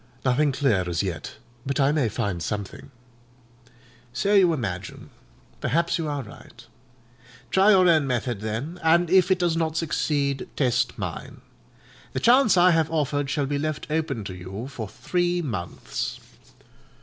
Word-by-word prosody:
"Nothing 140 +3 +3
clear 115 - +1
as 85 +2 -1
yet: 85 -6 -5 0.3
but 140 +2 -2
I 140 +1 +4
may 145 -7 +1
find 100 -5 -3
something." 105 +7 -5 1.2
"So 200 +10 0
you 190 -4 +6
imagine: 100 - -5 0.5
perhaps 170 +2 0
you 160 - -2
are 145 -2 -3
right. 105 - -14 0.9
Try 190 +2 +5
your 185 -3 +6
own 155 -5 +4
method, 120 -4 -2
then; 120 +11 -4
and 170 +1 +3
if 185 -1 +5
it 190 - +3
does 175 -2 +1
not 160 -1 -1
succeed, 145 -4 -1
test 125 -5 0
mine. - - -6 0.7
The - - -1
chance 240 -4 +5
I 180 +1 +6
have 160 -2 +2
offered 145 -3 -1
shall 140 0 0
be 140 +1 -2
left 155 0 -4
open 150 -8 -1
to 95 - -6
you 95 +6 -7
for 115 -7 -6
three 175 - -1
months." 95 - -4
145 Hz, 150 wpm, -25 LUFS, 115-170 Hz, 1.2 s, you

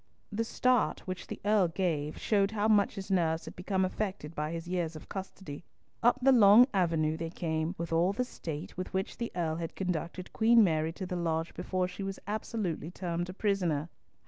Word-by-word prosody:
The 225 +2 0
start 250 +1 +1
which 185 -1 -6
the - - -6
Earl 205 -3 +4
gave 165 -4 -1
showed 200 -2 +2
how 215 0 0
much 205 -3 +3
his 195 0 -6
nerves 165 -3 +1
had - - -9
become 190 +1 0
affected 185 -5 -3
by 150 0 -2
his 165 0 -5
years 175 -3 -2
of 155 - -10
custody. 190 -5 -7 0.4
Up 240 +1 +4
the 270 - +7
long 225 -1 +8
avenue 165 -4 +1
they 165 0 -4
came, 160 0 -2
with 170 0 -4
all 170 +3 +3
the 250 +5 -1
state 160 - -7
with 185 +1 -5
which 190 +1 -2
the 235 - -3
Earl 160 -2 -1
had 165 -1 -5
conducted 180 0 -3
Queen 230 0 +6
Mary 160 -3 +1
to 185 - -5
the 180 0 -4
lodge 165 -1 -1
before 185 -1 -1
she 180 +2 -8
was 195 0 -3
absolutely 205 -6 -3
termed 175 -1 -3
a - - -5
prisoner. 175 -7 0
180 Hz, 200 wpm, -31 LUFS, 165-200 Hz, 0.4 s, long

